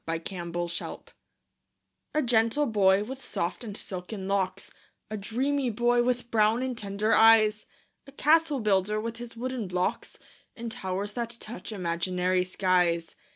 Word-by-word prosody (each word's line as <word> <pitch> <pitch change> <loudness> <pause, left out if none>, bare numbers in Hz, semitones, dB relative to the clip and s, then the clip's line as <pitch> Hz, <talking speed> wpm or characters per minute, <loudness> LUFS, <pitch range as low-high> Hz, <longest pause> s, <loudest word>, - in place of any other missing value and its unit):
THE 165 0 -1
CASTLE 175 +1 -5
BUILDER 175 0 -4 1.1
A 305 - +3
gentle 235 +4 +3
boy, 200 -4 +3
with 265 +4 -8
soft 175 +7 -3
and 210 -3 -6
silken 190 +1 -6
locks 195 -2 -1 0.4
A - - -2
dreamy 255 +6 -1
boy, 240 +2 +2
with 245 0 -1
brown 220 +2 +3
and 260 -1 -2
tender 210 0 -1
eyes, 215 -1 +5 0.4
A - - -11
castle 305 -1 +3
builder, 210 0 +2
with 230 +1 -4
his 235 -1 -9
wooden 250 -3 -3
blocks, 180 0 -2 0.4
And 230 -1 -6
towers 195 +1 -3
that 235 0 -4
touch 225 +1 -7
imaginary 180 0 0
skies. 180 -2 +1
215 Hz, 145 wpm, -28 LUFS, 185-240 Hz, 1.1 s, eyes